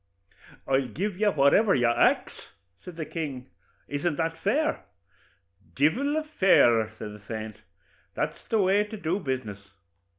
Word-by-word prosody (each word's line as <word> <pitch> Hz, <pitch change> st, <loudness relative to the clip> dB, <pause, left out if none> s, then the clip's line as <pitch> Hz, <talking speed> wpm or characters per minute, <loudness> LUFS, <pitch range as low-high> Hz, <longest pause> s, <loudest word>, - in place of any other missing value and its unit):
'I'll 135 Hz, -1 st, +1 dB
give 185 Hz, -, -4 dB
you 210 Hz, -1 st, +3 dB
whatever 190 Hz, +7 st, +4 dB
you 125 Hz, -2 st, +2 dB
ax,' 120 Hz, 0 st, +2 dB, 0.5 s
says 180 Hz, -, -10 dB
the 160 Hz, -1 st, -5 dB
king; 140 Hz, -7 st, -6 dB, 0.4 s
'isn't 145 Hz, +3 st, -2 dB
that 165 Hz, +1 st, -2 dB
fair?' 300 Hz, +10 st, 0 dB, 0.9 s
'Divil 255 Hz, -, +1 dB
a 315 Hz, -, -1 dB
fairer,' 120 Hz, -, +3 dB
says 105 Hz, -, -7 dB
the 105 Hz, -, -13 dB
saint; 110 Hz, -2 st, -6 dB, 0.6 s
'that's -, -, -4 dB
the 225 Hz, -, +2 dB
way 195 Hz, +1 st, +3 dB
to 210 Hz, +1 st, -8 dB
do 175 Hz, +1 st, -1 dB
business. 130 Hz, -, -4 dB
160 Hz, 140 wpm, -26 LUFS, 125-205 Hz, 0.9 s, whatever